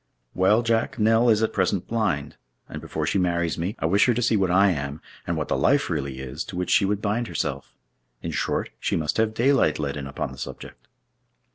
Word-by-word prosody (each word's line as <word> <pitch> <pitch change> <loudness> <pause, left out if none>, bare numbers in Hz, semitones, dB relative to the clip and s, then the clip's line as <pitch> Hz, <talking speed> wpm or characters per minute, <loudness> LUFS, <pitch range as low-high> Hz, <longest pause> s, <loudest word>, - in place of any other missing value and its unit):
"Well, 105 +5 +3
Jack, 115 0 0
Nell 115 +2 +4
is 110 -1 +3
at 110 - 0
present 95 -1 0
blind; 110 -11 -1 0.3
and - - -7
before 80 - -3
she 90 +5 +1
marries 85 -3 0
me, 90 +5 -2
I - - -3
wish 100 +8 +4
her 120 - +3
to 125 - 0
see 115 - +3
what 95 -3 +2
I 95 +2 +5
am, 70 -2 -4 0.3
and 85 - -1
what 75 - -2
the - - 0
life 135 - +2
really 70 -4 -3
is 65 +4 -5
to - - -8
which 90 0 -2
she 100 - +4
would 105 +1 -1
bind 110 +3 0
herself. - - -4 0.5
In - - -3
short, - - -2
she - - -1
must 75 -2 -1
have 110 0 +1
daylight 130 - +3
let 70 -2 -3
in 70 -2 -5
upon 65 -1 -4
the 65 - -11
subject!" - - -9
95 Hz, 225 wpm, -24 LUFS, 75-110 Hz, 0.5 s, I